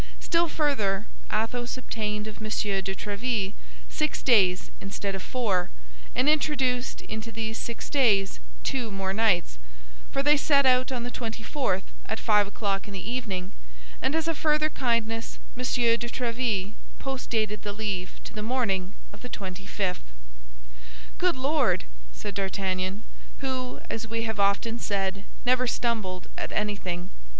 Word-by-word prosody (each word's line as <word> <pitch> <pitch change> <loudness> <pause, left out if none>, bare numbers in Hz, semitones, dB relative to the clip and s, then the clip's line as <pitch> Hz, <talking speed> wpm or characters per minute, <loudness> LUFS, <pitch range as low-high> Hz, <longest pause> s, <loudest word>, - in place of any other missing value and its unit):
Still 340 0 +3
further, 220 -11 +2 0.3
Athos 240 +4 0
obtained 210 -4 -2
of 215 -1 -6
M. 220 - -6
de 195 -3 0
Tréville 205 0 -1 0.3
six 305 -1 -1
days 195 -7 +5
instead 195 0 -3
of 195 - -3
four, 205 -8 +1 0.5
and 255 +3 +3
introduced 270 -5 +2
into 220 +1 -5
these 225 0 -2
six 235 - -4
days 215 -9 +3 0.2
two 250 -4 0
more 195 -1 -1
nights—for - - -1
they 295 +1 +6
set 280 -1 +4
out 255 0 +5
on 245 -2 -1
the 245 - -3
twenty 225 -2 -4
fourth 225 -9 0 0.2
at 220 - -1
five 210 -2 +4
o'clock 200 -1 -1
in 205 - -7
the 195 +4 -3
evening, 195 -8 -2 0.5
and 280 - +2
as 320 0 +1
a 330 - +3
further 305 0 +3
kindness 230 -3 0 0.2
M. 250 - -5
de 240 -2 +3
Tréville 230 -5 0 0.2
post 270 -1 -4
dated 215 -2 +1
the 205 - -3
leave 200 -3 -3
to - - -8
the 215 - -4
morning 210 -5 0 0.2
of - - -12
the 250 - -7
twenty 195 -2 -6
fifth. 190 -3 -1 1.2
"Good - - +3
Lord!" 265 - +2 0.3
said 205 - -5
D'Artagnan, 190 0 -1 0.4
who, 260 -2 -2
as 225 0 -3
we 230 +1 -1
have 220 -2 -2
often 200 +4 +2
said, 195 -1 -1 0.2
never 255 0 +4
stumbled 215 -7 -1
at - - -3
anything. 190 -4 -1
220 Hz, 150 wpm, -28 LUFS, 195-250 Hz, 1.2 s, they